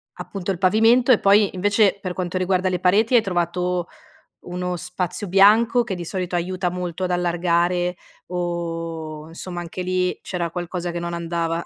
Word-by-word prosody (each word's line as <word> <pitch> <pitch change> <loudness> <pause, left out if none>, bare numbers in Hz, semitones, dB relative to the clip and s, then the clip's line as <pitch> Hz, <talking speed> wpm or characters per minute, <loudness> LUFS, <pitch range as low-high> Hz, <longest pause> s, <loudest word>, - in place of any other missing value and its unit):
appunto, 195 -1 -5
il 185 - -3
pavimento 225 +7 +4
e 225 - +3
poi, 200 0 +4
invece, 205 +2 +3
per 185 - -3
quanto 180 0 -3
riguarda 185 0 +1
le 185 -1 0
pareti, 210 +7 +3
hai 235 - +7
trovato 180 -1 -1 0.6
uno 180 0 -3
spazio 180 +3 -4
bianco, 220 +6 +5
che 210 -4 -3
di 175 -2 -6
solito 180 0 -3
aiuta 180 +1 -1
molto 180 0 -4
ad 180 - -2
allargare, 175 0 +1 0.3
o 165 -3 -4
insomma, 175 +2 -6
anche 175 +2 -6
lì, 180 0 -1
c'era 175 -2 -3
qualcosa 175 0 -4
che 175 - -3
non 170 0 -4
andava? 170 0 -2
180 Hz, 165 wpm, -22 LUFS, 175-190 Hz, 0.6 s, hai